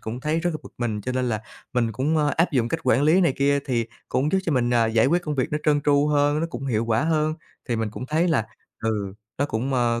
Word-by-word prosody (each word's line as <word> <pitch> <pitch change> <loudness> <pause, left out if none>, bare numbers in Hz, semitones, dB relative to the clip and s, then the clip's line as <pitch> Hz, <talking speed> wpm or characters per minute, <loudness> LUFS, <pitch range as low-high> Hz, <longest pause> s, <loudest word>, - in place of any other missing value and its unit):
cũng 115 +3 -5
thấy 155 +4 0
rất 175 - 0
là 155 - -3
bực - - -12
mình, 110 -4 -2
cho 125 +5 -3
nên 125 -1 0
là 110 -1 -2 0.3
mình 115 -2 +1
cũng, 140 +8 0
a, 150 -1 +2
áp 165 +1 +2
dụng 120 -4 +1
cách - - -2
quản 125 +5 +3
lý 160 +5 +5
này 170 -7 +3
kia, 140 +1 +2
thì 120 -3 0 0.2
cũng 145 +4 0
giúp 190 - +4
cho 165 - 0
mình, 120 -3 +1
à, 115 -1 +4
giải 110 +2 +3
quyết 175 +4 +2
công 150 -2 -3
việc 130 0 -1
nó 150 - +1
trơn 145 -1 +3
tru 145 0 +3
hơn, 145 +1 +2
nó 165 - 0
cũng 135 +3 -5
hiệu 115 -3 0
quả 115 +5 +1
hơn. 155 -1 +1 0.3
Thì 120 - 0
mình 110 -2 -2
cũng 125 +3 -7
thấy 160 +4 +1
là, 130 -9 +1 0.4
ừ, 105 -3 -2 0.2
nó 140 - +2
cũng, 130 +2 -2
ờ, 120 -1 +1
135 Hz, 280 wpm, -24 LUFS, 115-150 Hz, 0.4 s, lý